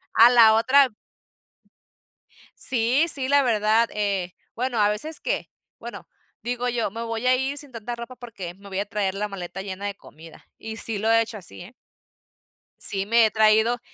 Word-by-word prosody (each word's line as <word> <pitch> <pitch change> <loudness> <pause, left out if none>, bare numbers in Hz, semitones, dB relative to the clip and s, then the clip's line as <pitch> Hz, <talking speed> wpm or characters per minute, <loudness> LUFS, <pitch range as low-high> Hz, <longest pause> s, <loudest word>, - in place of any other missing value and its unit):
a 230 +2 +8
la 225 -2 +7
otra 260 +4 +4 1.7
Sí, 250 +5 +2
sí, 265 -3 +1
la 285 0 +4
verdad. 220 0 +2
Eh, 195 -4 -2 0.2
bueno, 245 -1 -2
a 205 0 +4
veces 300 +10 -2
que - - -3 0.3
bueno, - - -9 0.3
digo 245 0 -2
yo: 235 -5 -1
"Me 230 +1 -5
voy 230 +1 -4
a 255 - +5
ir 270 +2 -2
sin 285 -2 -6
tanta 235 +1 -6
ropa 235 +2 -9
porque 200 -8 -8
me 200 +1 -15
voy 190 0 -3
a 205 - -1
traer 200 -2 -2
la 210 +1 -2
maleta 190 -1 -7
llena 195 0 -6
de 200 -1 -3
comida", 160 -3 -15
y 220 0 -7
sí 225 -2 -3
lo 220 +2 +1
he 230 0 +5
hecho 225 -1 -5
así, 180 -2 -8
eh. 200 +8 -12 1.1
Sí 195 -1 -1
me 230 +1 +4
he 215 - +1
traído 220 +2 +3
225 Hz, 185 wpm, -24 LUFS, 205-245 Hz, 1.7 s, a